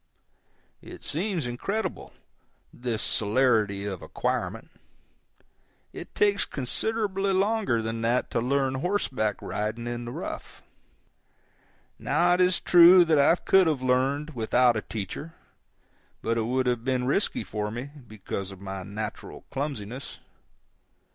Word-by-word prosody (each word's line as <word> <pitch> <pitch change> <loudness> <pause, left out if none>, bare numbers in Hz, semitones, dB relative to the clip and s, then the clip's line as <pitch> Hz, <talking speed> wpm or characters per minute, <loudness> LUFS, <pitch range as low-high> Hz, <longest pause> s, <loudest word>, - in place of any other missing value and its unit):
It - - -12
seems 175 -2 -2
incredible, 195 - -3 0.6
this 120 -3 -1
celerity 105 -3 +2
of 95 -3 -5
acquirement. - - -3 1.2
It - - -10
takes 205 -1 +3
considerably 195 - -1
longer 195 - +1
than 115 +1 -3
that 120 +2 0
to - - 0
learn 135 +1 +1
horseback 130 - -1
riding 110 +3 -3
in 120 0 -4
the 120 - -6
rough. - - -7 1.4
Now 175 +1 +2
it 180 - +2
is 180 0 +3
true 175 +1 +7
that 160 -3 +3
I 140 +4 +5
could 190 0 +3
have 145 -5 0
learned 135 +4 +1
without 120 +1 +3
a 110 - -1
teacher, 110 - -6 0.9
but 115 - 0
it 115 -1 0
would 130 +1 0
have 120 -2 0
been 130 -1 0
risky 150 +10 0
for 105 -1 -4
me, 120 +6 -6 0.2
because 100 -2 -6
of 95 -2 -11
my 95 -1 -6
natural 105 +3 -7
clumsiness. 135 -3 -5
125 Hz, 130 wpm, -26 LUFS, 110-170 Hz, 1.4 s, true